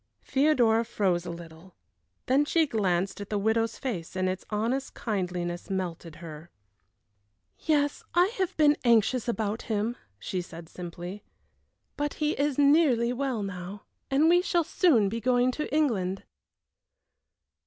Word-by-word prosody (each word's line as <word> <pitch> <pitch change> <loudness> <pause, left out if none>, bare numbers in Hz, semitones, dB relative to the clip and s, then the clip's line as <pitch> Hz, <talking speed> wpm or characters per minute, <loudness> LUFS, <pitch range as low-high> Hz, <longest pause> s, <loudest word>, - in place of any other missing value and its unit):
Theodora 250 -6 +3
froze 185 -6 0
a - - -4
little. 170 +1 -10 0.5
Then 270 +3 +3
she 320 +2 +2
glanced 195 - -1
at 200 - -7
the 210 - -1
widow's 220 +2 0
face 185 -11 -5
and 185 0 0
its 185 0 -3
honest 235 +6 -2
kindliness 180 -5 -3
melted 175 -4 -4
her. 160 -1 -10 1.1
"Yes, 290 -2 +1
I 360 +5 +4
have 375 -2 -1
been 295 -1 +5
anxious 235 +1 +3
about 220 -2 -1
him," 220 +2 0 0.2
she 185 - -3
said, 170 -1 -10
simply, 180 +3 -8 0.7
"but 290 0 -2
he 300 0 0
is 285 -2 0
nearly 280 -5 +4
well 250 -4 -2
now, 195 +1 -6 0.3
and 280 +4 +3
we 350 +1 +5
shall 345 -2 +1
soon 280 - +3
be 230 +4 -3
going 250 +1 +3
to 300 +4 -4
England." 205 -12 0
220 Hz, 140 wpm, -28 LUFS, 185-280 Hz, 1.1 s, been